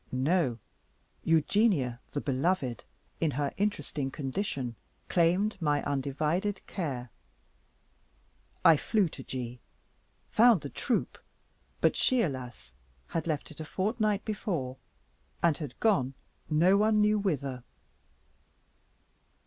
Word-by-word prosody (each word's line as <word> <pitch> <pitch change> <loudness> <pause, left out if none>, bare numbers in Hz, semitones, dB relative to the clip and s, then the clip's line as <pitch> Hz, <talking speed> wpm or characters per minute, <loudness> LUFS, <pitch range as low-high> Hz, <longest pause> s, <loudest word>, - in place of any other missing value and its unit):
No, 130 -1 +1 0.7
Eugenia, 165 - +2
the 145 - -1
beloved, 135 - 0 0.4
in 165 - +2
her 140 0 -1
interesting 195 -9 -1
condition, 135 - -3 0.3
claimed 185 +4 +2
my 145 -2 +1
undivided 150 +8 -1
care. 130 - -4 1.5
I 165 -2 +8
flew 210 +3 +2
to 140 - -9
G, 125 -2 -5 0.7
found 230 -5 +5
the 140 - -6
troop; 245 - -1 0.6
but - - +4
she, 255 -3 +3
alas! 125 - -5 0.4
had 165 - -2
left 155 -2 -2
it 155 - -13
a - - -4
fortnight 210 +4 0
before, 170 - -3 0.7
and 170 -3 +4
had 145 -6 -7
gone 140 - +2 0.3
no 170 +5 +5
one 215 +1 +3
knew 210 0 +4
whither. 140 - -2
155 Hz, 110 wpm, -30 LUFS, 135-200 Hz, 1.5 s, I